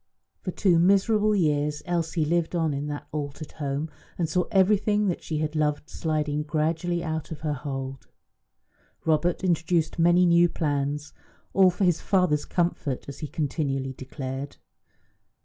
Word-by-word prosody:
For -, -, -4 dB
two 180 Hz, -2 st, +3 dB
miserable 210 Hz, +4 st, +4 dB
years 150 Hz, -4 st, +1 dB
Elsie 170 Hz, -2 st, 0 dB
lived 170 Hz, +2 st, 0 dB
on 160 Hz, -3 st, +1 dB
in 140 Hz, +1 st, -3 dB
that 145 Hz, 0 st, -5 dB
altered 150 Hz, 0 st, -5 dB
home, 145 Hz, +1 st, -3 dB, 0.3 s
and 170 Hz, -, 0 dB
saw 180 Hz, +3 st, +1 dB
everything 210 Hz, +1 st, +3 dB
that 175 Hz, -, -2 dB
she 155 Hz, -, -3 dB
had 155 Hz, 0 st, -2 dB
loved 150 Hz, 0 st, 0 dB
sliding 150 Hz, -2 st, -1 dB
gradually 160 Hz, +3 st, -1 dB
out 160 Hz, -2 st, -3 dB
of 155 Hz, -2 st, -7 dB
her 155 Hz, -2 st, -1 dB
hold. 135 Hz, -1 st, -5 dB, 1.0 s
Robert 165 Hz, +3 st, +1 dB
introduced 170 Hz, -2 st, +1 dB
many 175 Hz, +2 st, +5 dB
new 170 Hz, 0 st, +5 dB
plans, 145 Hz, -1 st, -2 dB, 0.4 s
all 190 Hz, -1 st, +6 dB
for 180 Hz, +3 st, -2 dB
his 175 Hz, -3 st, +2 dB
father's 180 Hz, -6 st, +2 dB
comfort, 170 Hz, -6 st, -1 dB
as 140 Hz, -, -8 dB
he 155 Hz, -, -4 dB
continually 135 Hz, -3 st, -2 dB
declared. 135 Hz, +1 st, -6 dB
160 Hz, 150 wpm, -26 LUFS, 145-175 Hz, 1.0 s, all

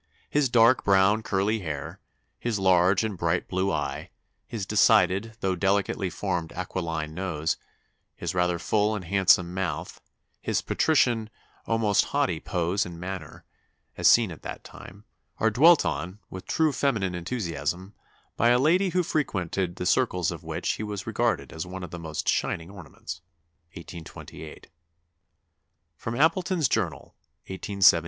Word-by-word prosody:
His 145 Hz, -3 st, +2 dB
dark 120 Hz, +1 st, +5 dB
brown, 100 Hz, +2 st, +4 dB
curly 105 Hz, +2 st, 0 dB
hair, 75 Hz, -7 st, -5 dB, 0.4 s
his 120 Hz, -3 st, -1 dB
large 95 Hz, +1 st, +4 dB
and 110 Hz, -3 st, -2 dB
bright 85 Hz, 0 st, 0 dB
blue 95 Hz, +1 st, 0 dB
eye, 70 Hz, +3 st, -3 dB, 0.4 s
his 110 Hz, -4 st, -4 dB
decided, 100 Hz, +1 st, +3 dB
though 95 Hz, -1 st, 0 dB
delicately 100 Hz, 0 st, 0 dB
formed 90 Hz, -1 st, -3 dB
aquiline 85 Hz, -4 st, -4 dB
nose, 80 Hz, -3 st, -2 dB, 0.6 s
his -, -, -4 dB
rather 90 Hz, -1 st, +1 dB
full 105 Hz, +4 st, +1 dB
and 95 Hz, -4 st, -5 dB
handsome 90 Hz, -1 st, +3 dB
mouth, 90 Hz, -3 st, -4 dB, 0.4 s
his -, -, -1 dB
patrician, 120 Hz, -8 st, +2 dB, 0.4 s
almost 110 Hz, -3 st, +2 dB
haughty -, -, 0 dB
pose 90 Hz, +3 st, -1 dB
and 85 Hz, -1 st, -8 dB
manner, 90 Hz, -4 st, -7 dB, 0.5 s
as -, -, +2 dB
seen 115 Hz, -5 st, +5 dB
at 80 Hz, -, -10 dB
that -, -, -7 dB
time, 100 Hz, +3 st, -12 dB, 0.3 s
are 110 Hz, -, +2 dB
dwelt 160 Hz, +9 st, +6 dB
on, 90 Hz, +3 st, -3 dB
with 95 Hz, 0 st, -8 dB
true 160 Hz, -1 st, +2 dB
feminine 110 Hz, -10 st, 0 dB
enthusiasm, 90 Hz, -, -3 dB, 0.4 s
by 115 Hz, -, +3 dB
a 120 Hz, -, +5 dB
lady 175 Hz, +9 st, +3 dB
who 180 Hz, 0 st, +1 dB
frequented 95 Hz, -, -1 dB
the 90 Hz, -, -5 dB
circles 90 Hz, -5 st, +2 dB
of -, -, -8 dB
which -, -, -4 dB
he -, -, -5 dB
was 105 Hz, -2 st, -5 dB
regarded -, -, -1 dB
as 80 Hz, +3 st, -5 dB
one 95 Hz, +1 st, -7 dB
of 90 Hz, -, -7 dB
the 85 Hz, -, -6 dB
most 80 Hz, -2 st, -5 dB
shining 80 Hz, +3 st, 0 dB
ornaments." 90 Hz, -1 st, -9 dB, 0.5 s
1828. 80 Hz, -1 st, -10 dB, 1.3 s
[Sidenote: 120 Hz, +4 st, -2 dB
Appleton's 170 Hz, -2 st, +1 dB
Journal, 105 Hz, -8 st, -2 dB, 0.3 s
1873. 95 Hz, -2 st, +3 dB
95 Hz, 145 wpm, -26 LUFS, 85-110 Hz, 1.3 s, dwelt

